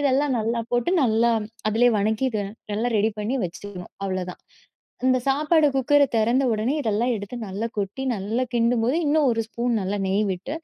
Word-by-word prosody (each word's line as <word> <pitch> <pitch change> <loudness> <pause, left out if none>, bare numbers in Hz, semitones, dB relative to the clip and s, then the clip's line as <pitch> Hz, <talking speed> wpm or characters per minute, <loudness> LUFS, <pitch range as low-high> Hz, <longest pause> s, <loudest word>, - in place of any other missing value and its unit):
இதெல்லாம் 280 0 +2
நல்லா 230 +2 -1
போட்டு, 245 +7 +1
நல்லா 235 0 +3 0.4
அதிலயே 230 +3 +3
வதக்கிட்டு 220 +2 0
இத - - -4 0.3
நல்லா 235 +3 0
ரெடி 215 +1 +2
பண்ணி 225 +6 -1
வச்சுக்கணும், 180 +1 -8
அவ்ளதான். 185 -1 -4 0.6
இந்த 255 0 +4
சாப்பாடு 300 +3 +3
குக்கர 290 +2 +4
தெறந்த 235 +4 +2
உடனே 220 +5 0
இதெல்லாம் 235 +1 0
எடுத்து 205 +4 -7
நல்லா 200 +4 -3
கொட்டி 205 +6 -3
நல்லா 220 +5 -2
கிண்டும்போது 235 +3 +2
இன்னும் 295 -2 +3
ஒரு 225 -1 0
ஸ்பூன் 235 -1 -1
நல்லா 195 +2 -2
நெய் 200 +3 +1
விட்டு, 185 +11 -5
230 Hz, 165 wpm, -24 LUFS, 205-260 Hz, 0.6 s, இந்த